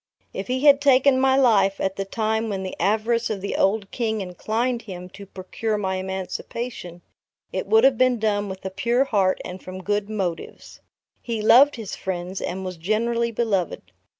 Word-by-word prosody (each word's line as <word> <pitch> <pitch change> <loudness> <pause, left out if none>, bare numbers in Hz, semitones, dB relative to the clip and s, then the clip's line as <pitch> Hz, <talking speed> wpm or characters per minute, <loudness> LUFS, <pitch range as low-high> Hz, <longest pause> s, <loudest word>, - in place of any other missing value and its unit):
If - - -5
he 255 +1 -1
had 285 -1 +6
taken 270 -1 +4
my 265 0 +4
life 200 -7 +3
at 190 0 -1
the 195 - -3
time 220 +2 -1
when 195 -2 -3
the 185 - -5
avarice 225 +3 +1
of 215 -3 -2
the 200 - -4
old 200 0 +1
King 220 -3 -1
inclined 220 +6 -2
him 180 -4 -9
to 200 +1 -12
procure 210 +4 -4
my 190 -2 -2
emancipation, 190 0 -5 0.5
it - - -3
would 445 0 +4
have 270 -4 +4
been 255 -1 +3
done 205 -2 0
with 190 0 -8
a 190 - -3
pure 240 +6 +1
heart 200 -8 +1
and 180 +1 -7
from 185 0 -8
good 205 +1 -1
motives. 190 -6 -5 0.4
He 230 -2 -3
loved 275 +6 +6
his 220 -5 -6
friends; 185 0 -4
and 190 +1 -4
was 185 -1 -5
generally 230 +6 0
beloved. 210 -6 -2
210 Hz, 180 wpm, -23 LUFS, 190-235 Hz, 0.5 s, had